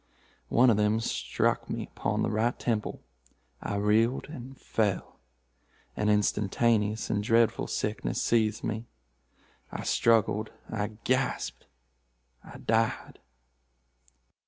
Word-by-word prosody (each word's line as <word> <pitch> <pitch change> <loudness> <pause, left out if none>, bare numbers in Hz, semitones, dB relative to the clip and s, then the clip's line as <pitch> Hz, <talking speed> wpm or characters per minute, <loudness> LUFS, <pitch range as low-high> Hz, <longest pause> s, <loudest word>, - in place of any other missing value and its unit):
One 125 0 +5
of 105 - +2
them 105 +1 +2
struck 115 - -1
me - - -3
upon - - 0
the - - 0
right 110 +3 +1
temple. 110 -3 -2 0.6
I - - -3
reeled 110 +5 +2
and 135 -3 -9
fell. 105 -5 -1 0.8
An 105 - 0
instantaneous 105 +1 +1
and 105 - +1
dreadful 115 +1 +2
sickness 105 +1 -2
seized 110 -2 +1
me. 110 +1 -3 0.8
I - - -5
struggled—I 110 -1 0
gasped—I - - -5
died." 115 0 0
110 Hz, 100 wpm, -29 LUFS, 105-115 Hz, 0.8 s, One